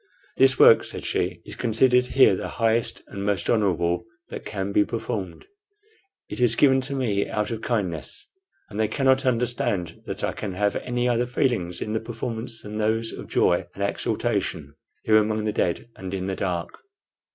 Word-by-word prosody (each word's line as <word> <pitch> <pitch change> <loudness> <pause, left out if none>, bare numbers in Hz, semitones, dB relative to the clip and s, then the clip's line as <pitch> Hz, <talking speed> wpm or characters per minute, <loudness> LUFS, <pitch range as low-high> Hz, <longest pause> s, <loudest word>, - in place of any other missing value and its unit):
"This 130 -1 +5
work," - - +7
said - - -5
she, 90 -1 -2
"is - - -7
considered 125 +2 +3
here 130 -7 +5
the - - -4
highest 115 0 +1
and 100 -1 -7
most 100 -4 0
honorable 90 -2 +1 0.2
that - - -7
can 100 -1 -3
be 105 - +4
performed. 100 -6 -5 0.8
It - - -7
is 120 -2 +3
given 135 0 +4
to 140 - -3
me 105 -7 0
out 105 +2 -1
of 115 -1 -4
kindness, 100 - -2 0.4
and 105 - -7
they 110 - +3
cannot 135 +3 +2
understand 115 -8 -1
that - - -5
I - - +1
can 100 -3 -5
have 105 +2 0
any 125 0 -1
other 120 0 +1
feelings 120 -9 0
in 110 - -4
the 110 - +1
performance 115 0 -5
than 105 +1 -6
those 115 +1 0
of - - -8
joy - - +2
and - - -3
exultation - - -1 0.3
here 110 -1 +5
among 110 0 +1
the 105 - -1
dead 90 +4 -1
and 95 -1 -7
in 95 -1 -3
the 95 0 -2
dark." 90 -3 -3
110 Hz, 180 wpm, -24 LUFS, 95-120 Hz, 0.8 s, work